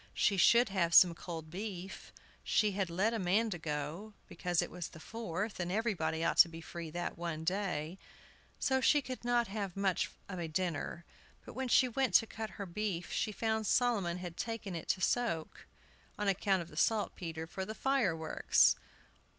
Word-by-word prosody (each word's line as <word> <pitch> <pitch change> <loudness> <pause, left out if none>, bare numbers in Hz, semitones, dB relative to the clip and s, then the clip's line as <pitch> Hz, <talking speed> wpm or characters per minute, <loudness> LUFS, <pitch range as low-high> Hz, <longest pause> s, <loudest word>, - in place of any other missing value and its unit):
She 200 - +3
should 235 +5 +5
have 170 -4 +1
some 175 -2 +9
cold 160 -2 -7
beef. 190 -1 -6 0.3
She 210 -2 +2
had 195 -2 -1
let 195 +7 +1
Amanda 205 -1 +1
go, 160 +7 -4
because 175 -2 -2
it - - 0
was 175 -3 -5
the - - -13
Fourth, 210 0 -4
and 175 0 -2
everybody 175 -7 0
ought - - +1
to 170 - +9
be 165 0 -9
free 165 0 -7
that 175 +1 -4
one 165 -2 -3
day; 180 -2 -2 0.6
so 265 0 +2
she 290 +1 +4
could 255 -1 -6
not 240 -1 +2
have 195 -3 -4
much 195 -2 +1 0.2
of 185 -2 -6
a 170 - -3
dinner. 170 0 -3 0.4
But - - -9
when 260 +1 -3
she 255 +1 +5
went 260 +2 0
to 225 - +7
cut 220 0 -6
her 200 - -4
beef 185 -1 -3
she 215 - -1
found 220 0 -1
Solomon 205 -9 +2
had 175 -2 -7
taken 225 -4 -4
it 165 - -6
to 185 - 0
soak, 185 -7 -1 0.5
on 210 - -2
account 195 -1 +2
of 170 - -14
the 150 - -13
saltpetre, 165 -5 0
for 190 +3 -5
the 215 +3 -6
fireworks! 195 - +2
190 Hz, 180 wpm, -33 LUFS, 170-220 Hz, 0.6 s, some